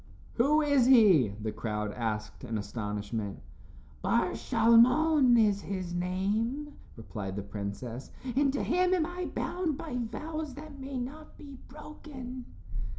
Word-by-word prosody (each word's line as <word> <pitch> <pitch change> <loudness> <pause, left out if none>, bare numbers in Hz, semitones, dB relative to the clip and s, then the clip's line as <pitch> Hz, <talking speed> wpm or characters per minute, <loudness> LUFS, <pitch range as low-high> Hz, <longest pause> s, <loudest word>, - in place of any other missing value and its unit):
"Who 300 +6 +3
is 285 -4 +4
he?" 205 - +7
the 110 0 -3
crowd 105 -2 -3
asked 105 -1 -4
in 115 -3 -3
astonishment. 105 0 -4 0.6
"Bar - - +2
Shalmon 255 +3 +5
is 205 -3 +3
his 185 -3 -4
name," 210 +11 -1 0.2
replied 105 -4 -6
the 100 - -4
princess, 105 +5 -6 0.3
"and 275 0 +3
to 280 - -2
him 365 +2 +2
am 330 -4 +1
I 355 +1 -4
bound 345 -6 -2
by 305 -5 -6
vows 305 +5 -4
that 295 -1 -10
may 270 0 -5
not 300 +5 -8
be 280 -3 -11
broken." 265 -4 -9
240 Hz, 135 wpm, -30 LUFS, -, 0.6 s, he